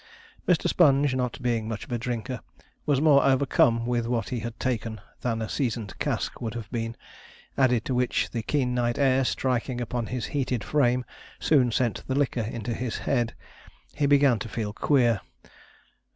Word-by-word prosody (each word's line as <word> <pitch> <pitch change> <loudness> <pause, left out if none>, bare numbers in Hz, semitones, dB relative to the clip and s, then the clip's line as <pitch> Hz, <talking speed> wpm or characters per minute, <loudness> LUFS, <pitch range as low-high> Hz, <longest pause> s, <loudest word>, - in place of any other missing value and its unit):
Mr. 180 -4 +3
Sponge, 140 -4 +4
not 125 -1 -2
being 115 -3 0
much 110 -1 -4
of - - -14
a 120 - 0
drinker, 120 +1 -3 0.5
was 145 -3 +3
more 145 -2 +5
overcome 130 -4 +3
with 120 -1 0
what 120 -1 -1
he 125 - -2
had 115 +1 -6
taken 115 -3 -2 0.2
than 115 -2 -1
a - - -3
seasoned 115 -7 -2
cask - - -2
would 115 -1 -4
have 115 -4 -5
been; 115 -1 -3 0.6
added 125 -4 +2
to 130 - -1
which 125 0 0
the 115 - -2
keen 125 +1 0
night 120 -1 0
air 135 -1 +3
striking 125 -1 -1
upon 120 -1 -3
his 125 -1 -3
heated 130 -5 -1
frame 125 -4 +2 0.3
soon 130 -6 +3
sent 120 -1 0
the 130 - -1
liquor 135 -4 +1
into 115 +1 -3
his 120 0 -3
head. 120 -4 0 0.6
He 145 - +1
began 140 -5 +4
to 110 - -5
feel 105 -1 -3
queer. 120 -5 +2
125 Hz, 175 wpm, -26 LUFS, 115-130 Hz, 0.6 s, more